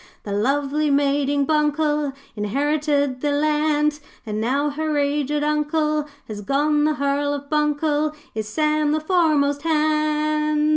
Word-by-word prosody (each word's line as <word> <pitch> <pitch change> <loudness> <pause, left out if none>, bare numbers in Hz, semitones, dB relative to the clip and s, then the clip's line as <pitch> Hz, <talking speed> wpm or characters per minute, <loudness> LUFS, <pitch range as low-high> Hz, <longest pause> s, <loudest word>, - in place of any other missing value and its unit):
'The 205 - -6
lovely 280 +7 0
maiding 280 0 +1
Buncle 300 -1 +1 0.2
Inherited 285 +4 0
the 295 - 0
land; 300 0 +1 0.3
And, 215 -1 -3
now 280 +6 0
her 305 +1 -2
aged 290 +1 0
Uncle 300 0 0 0.2
Has 210 -2 -6
gone, 295 +6 +1
the 305 0 +1
Hearl 285 0 0
of 285 +1 -9
Buncle 300 0 +1 0.2
Is 220 -1 -4
Sam, 305 +4 +1
the 310 - +1
foremast 310 -4 +2
hand.' 305 -1 +1
295 Hz, 130 wpm, -22 LUFS, 280-305 Hz, 0.3 s, foremast